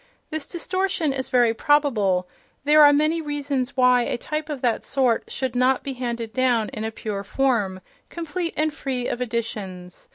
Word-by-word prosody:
This 310 -2 -4
distortion 365 -3 -1
is 260 -1 -4
very 240 -3 +4
probable: 220 -10 +2 0.4
there 300 +2 +6
are 290 - +8
many 305 +3 +2
reasons 280 -3 -3
why 250 -1 +5
a 240 - -1
type 305 +4 -4
of 290 -4 -4
that 240 -3 0
sort 255 -4 +1
should 260 -2 -3
not 255 +1 +2
be 275 - -4
handed 235 -3 -4
down 245 -4 +2
in 215 - -6
a 220 - -1
pure 210 -2 -5
form, 205 -5 0 0.3
complete 335 +1 -4
and 310 0 +1
free 260 -4 -3
of 240 - -3
additions. 210 -7 -5
255 Hz, 170 wpm, -23 LUFS, 230-295 Hz, 0.4 s, are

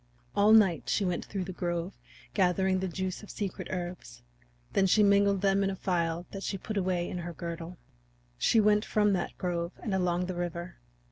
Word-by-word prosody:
All 205 +1 +5
night 200 -7 +5
she 200 - +1
went 180 -1 -1
through 195 -2 -3
the 185 +1 -6
grove 175 +1 -2 0.4
gathering 190 -1 +2
the 190 - -1
juice 185 +1 -3
of 210 - -12
secret 200 -3 -4
herbs; 175 -10 -6 0.5
then 195 -1 +3
she 210 +3 +5
mingled 200 -1 +4
them 195 0 +3
in 195 - +1
a 195 - -3
phial 170 -2 -1
that 195 - -6
she 195 - -2
put 215 +3 -6
away 180 -3 0
in 180 - -4
her 175 0 -5
girdle. 170 +1 -6 0.6
She 225 - +4
went 210 0 +4
from 210 -2 +2
that 185 - -2
grove 170 -1 -2
and 215 - -2
along 180 -1 +1
the 185 - -3
river. 175 0 -4
185 Hz, 195 wpm, -29 LUFS, 175-200 Hz, 0.6 s, All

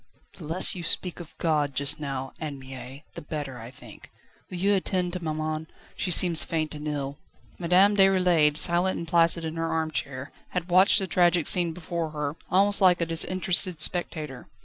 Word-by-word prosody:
"The 155 - -8
less 165 +4 +1
you 180 - -6
speak 175 +1 0
of 170 -2 -12
God 150 -4 0
just 140 +3 +2
now, 135 -3 -5
Anne 150 -3 -5
Mie, 130 +1 -10
the - - -8
better, 145 -4 -6
I 115 +1 -9
think. 125 - -14 0.4
Will 180 - -6
you 200 +3 +2
attend 185 -2 -1
to 180 -2 -5
maman? 155 0 -3 0.3
she 185 - -3
seems 170 -1 +4
faint 160 -2 -2
and 150 0 -7
ill." 140 -2 -4 0.4
Madame 185 +4 +4
Déroulède, 180 -6 +3
silent 175 +3 +3
and 170 - -6
placid 170 0 +2
in 160 +1 -5
her 165 0 -2
arm 160 -1 -1
chair, 130 0 -4 0.2
had 180 0 -3
watched 185 +3 +5
the 195 - +1
tragic 175 -2 +2
scene 175 -2 +2
before 170 -1 -4
her, 150 -1 -4
almost 200 +2 +2
like 180 -2 +5
a 170 - 0
disinterested 180 +1 0
spectator. 155 -5 -1
165 Hz, 185 wpm, -26 LUFS, 150-180 Hz, 0.4 s, watched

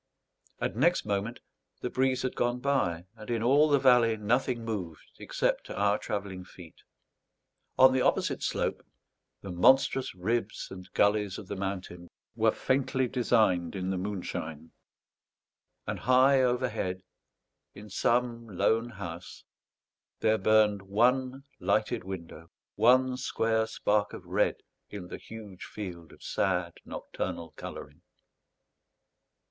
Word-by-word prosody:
And 95 - -2
next 170 +9 +2
moment 105 +3 -2 0.4
the 125 - -3
breeze 130 0 +1
had 130 - -2
gone 120 +1 0
by, 125 -12 0
and 110 0 -11
in 115 -2 0
all 145 +5 +5
the 145 - +5
valley 125 -4 +4
nothing 120 +2 0
moved 90 -8 -6
except - - -1
our 100 +1 +1
travelling 100 -3 -4
feet. 90 -2 -14 1.0
On 130 0 +7
the 130 - +2
opposite - - +1
slope, - - -1 0.6
the 95 - -6
monstrous 130 +6 +3
ribs 110 +4 -2
and 95 -1 -10
gullies 100 -2 +2
of 95 - -9
the 100 - -4
mountain 95 -3 -5 0.3
were - - +3
faintly 130 -1 0
designed 110 -8 +2
in 95 0 -2
the 95 - -1
moonshine; 80 -5 -5 1.1
and - - -3
high 130 +2 +5
overhead, 120 -7 -1 0.7
in 105 +1 -10
some 115 +3 0
lone 110 +4 +1
house, 90 -5 -8 0.8
there 110 0 +2
burned 110 -2 +4
one 125 +7 +1 0.2
lighted 100 +1 0
window, 85 -3 -8 0.2
one 130 0 +4
square 110 -3 0
spark 105 -1 0
of - - -9
red - - 0 0.3
in 95 -4 -8
the - - -7
huge 105 -5 -10
field 90 -5 -8
of - - -16
sad 90 -3 0
nocturnal 85 -1 -5
colouring. - - -9
110 Hz, 125 wpm, -29 LUFS, 95-125 Hz, 1.1 s, On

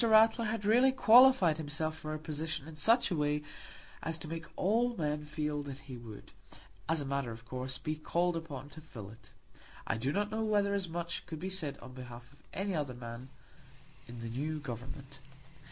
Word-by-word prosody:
Ratler 225 +1 +6
had 215 -1 -2
really 245 +5 +6
qualified 245 -9 +7
himself 155 +1 -1
for 155 -1 -4
a - - -2
position 155 -1 -4
in 160 - -9
such 230 +8 +4
a - - +2
way 150 0 +1 0.6
as 165 0 -2
to 165 - -6
make 165 +1 -5
all 235 +4 +2
men 150 -1 -1
feel 150 -1 -2
that 140 -2 -6
he 135 -2 -9
would, 115 -4 -10 0.6
as 160 -2 +2
a - - -3
matter 140 -2 -1
of 115 0 -8
course, 130 +2 -3
be 155 0 -3
called 175 +3 +1
upon 145 -5 -5
to 160 +2 -11
fill 110 -10 -9
it. 115 - -16 0.6
I - - 0
do 130 +5 0
not 205 +5 0
know 220 +1 0
whether 205 -2 +2
as 195 -3 0
much 170 +1 -4
could 160 -3 -5
be 190 +3 -3
said 160 -7 -2
on 130 +1 -10
behalf 125 0 -10
of 145 - -21
any 195 0 -2
other 145 -6 -1
man 120 +1 -7 0.8
in 120 -1 -8
the 115 - -4
new 150 +7 -2
Government. 130 +1 -7
155 Hz, 200 wpm, -33 LUFS, 135-185 Hz, 0.8 s, qualified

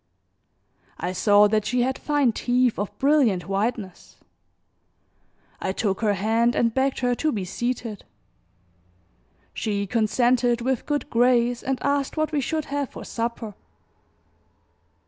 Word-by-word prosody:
I 180 - -2
saw 205 +2 +5
that 215 0 +1
she 245 +2 +1
had 260 +1 0
fine 290 -5 +2
teeth 245 0 +1
of 205 - -4
brilliant 265 -11 +2
whiteness; 200 -1 -3 1.4
I - - -1
took 195 -1 -1
her 210 -2 +2
hand 225 +5 +1
and 230 -1 +2
begged 265 +1 0
her 245 -1 +2
to 310 +5 0
be 200 -7 -3
seated; 230 +1 -4 1.5
she 200 -2 -2
consented 240 +3 +2
with 255 0 -2
good 295 0 -2
grace 240 0 +3
and 265 0 -1
asked 280 +1 0
what 310 0 0
we 295 -2 0
should 310 +3 -2
have 285 -1 -3
for - - -10
supper. 230 -2 -4
240 Hz, 130 wpm, -24 LUFS, 215-265 Hz, 1.5 s, saw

